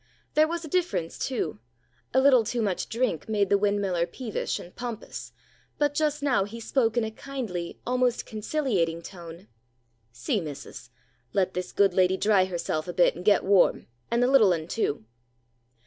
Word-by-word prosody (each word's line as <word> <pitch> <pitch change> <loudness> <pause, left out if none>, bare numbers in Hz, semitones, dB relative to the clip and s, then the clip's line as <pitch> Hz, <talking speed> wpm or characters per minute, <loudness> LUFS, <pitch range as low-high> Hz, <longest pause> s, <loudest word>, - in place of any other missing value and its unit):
There 310 +1 +5
was 340 0 -4
a - - -7
difference, 315 - -1
too. 165 - -2 0.5
A 260 - +4
little 265 -3 +6
too 235 +3 -3
much 195 -4 -2
drink 225 - -1
made 205 -3 +1
the 200 - +6
windmiller 200 -4 +1
peevish 240 -5 -3
and 175 - -11
pompous, 240 -3 -6 0.5
but 290 -1 +1
just 300 -1 0
now 260 -9 +3
he 215 +4 -7
spoke 230 0 0
in 240 - +3
a 220 - -3
kindly, 220 -9 -5
almost 250 -1 +1
conciliating 210 - -1
tone. 170 0 -10 0.6
"See, 125 - -1
missus! 135 -5 -8 0.4
Let 185 -1 +1
this 180 0 -4
good 200 -2 +3
lady 185 0 +3
dry 200 -3 +3
herself 170 -3 -3
a 175 - -4
bit, 175 - +4
and 175 - -8
get 205 +1 +4
warm, 195 -1 +3 0.2
and 235 +1 +2
the - - +4
little 225 -8 +6
un 160 -1 -4
too." 150 - -2
205 Hz, 170 wpm, -27 LUFS, 175-250 Hz, 0.6 s, little